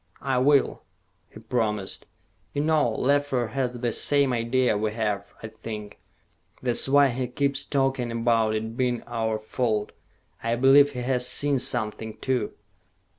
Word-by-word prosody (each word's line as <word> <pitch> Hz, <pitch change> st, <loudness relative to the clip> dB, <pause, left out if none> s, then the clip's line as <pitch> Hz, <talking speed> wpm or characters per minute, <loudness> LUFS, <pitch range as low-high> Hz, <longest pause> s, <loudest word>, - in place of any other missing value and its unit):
"I 130 Hz, -2 st, +1 dB
will," 140 Hz, +1 st, +3 dB, 0.5 s
he -, -, -12 dB
promised. 105 Hz, -5 st, -2 dB, 0.5 s
"You 145 Hz, -, 0 dB
know, 155 Hz, -5 st, +3 dB
Leffler 130 Hz, 0 st, 0 dB
has 125 Hz, 0 st, -2 dB
the 120 Hz, -1 st, -1 dB
same 140 Hz, +1 st, +2 dB
idea 120 Hz, 0 st, +1 dB
we 105 Hz, +1 st, -1 dB
have, 105 Hz, -3 st, -2 dB, 0.2 s
I 110 Hz, -, -5 dB
think. 110 Hz, -1 st, -8 dB, 0.6 s
That's 125 Hz, +1 st, +2 dB
why 140 Hz, 0 st, +5 dB
he 125 Hz, +1 st, -2 dB
keeps 140 Hz, +2 st, 0 dB
talking 135 Hz, -3 st, 0 dB
about 115 Hz, -1 st, +1 dB
it 110 Hz, +1 st, -4 dB
being 125 Hz, -1 st, -1 dB
our 115 Hz, -2 st, -1 dB
fault. 110 Hz, -1 st, -2 dB, 0.5 s
I 115 Hz, +1 st, 0 dB
believe 140 Hz, +3 st, +5 dB
he 125 Hz, -, -4 dB
has 125 Hz, -1 st, 0 dB
seen 145 Hz, -2 st, +1 dB
something, 110 Hz, -2 st, -2 dB
too. 125 Hz, -2 st, -1 dB
120 Hz, 145 wpm, -25 LUFS, 110-135 Hz, 0.6 s, why